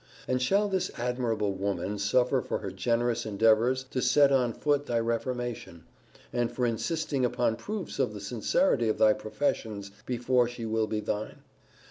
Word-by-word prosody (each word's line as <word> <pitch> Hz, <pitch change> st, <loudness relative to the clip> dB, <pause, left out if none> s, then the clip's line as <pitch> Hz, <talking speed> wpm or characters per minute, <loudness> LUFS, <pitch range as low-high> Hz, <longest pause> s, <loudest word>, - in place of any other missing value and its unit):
And 125 Hz, 0 st, 0 dB
shall 200 Hz, +11 st, +2 dB
this 190 Hz, -2 st, -1 dB
admirable 120 Hz, -4 st, -1 dB
woman 100 Hz, +1 st, -2 dB
suffer 125 Hz, +6 st, +2 dB
for -, -, -3 dB
her 95 Hz, -, -6 dB
generous 115 Hz, +4 st, 0 dB
endeavours 115 Hz, +5 st, +3 dB
to 130 Hz, -, -1 dB
set 140 Hz, +1 st, +5 dB
on 125 Hz, -3 st, +3 dB
foot 145 Hz, +4 st, 0 dB
thy 120 Hz, -1 st, +1 dB
reformation; 115 Hz, -6 st, -3 dB, 0.5 s
and 120 Hz, -1 st, 0 dB
for 125 Hz, -, -1 dB
insisting 135 Hz, +4 st, -1 dB
upon 120 Hz, -2 st, +1 dB
proofs 195 Hz, -, -5 dB
of 130 Hz, -5 st, +1 dB
the -, -, -6 dB
sincerity 120 Hz, -, +1 dB
of 110 Hz, -, 0 dB
thy 110 Hz, -1 st, +5 dB
professions 110 Hz, -4 st, -3 dB, 0.2 s
before 125 Hz, 0 st, +2 dB
she 120 Hz, -1 st, -6 dB
will 110 Hz, 0 st, 0 dB
be 105 Hz, 0 st, -2 dB
thine? 105 Hz, 0 st, -4 dB
120 Hz, 160 wpm, -28 LUFS, 110-130 Hz, 0.5 s, set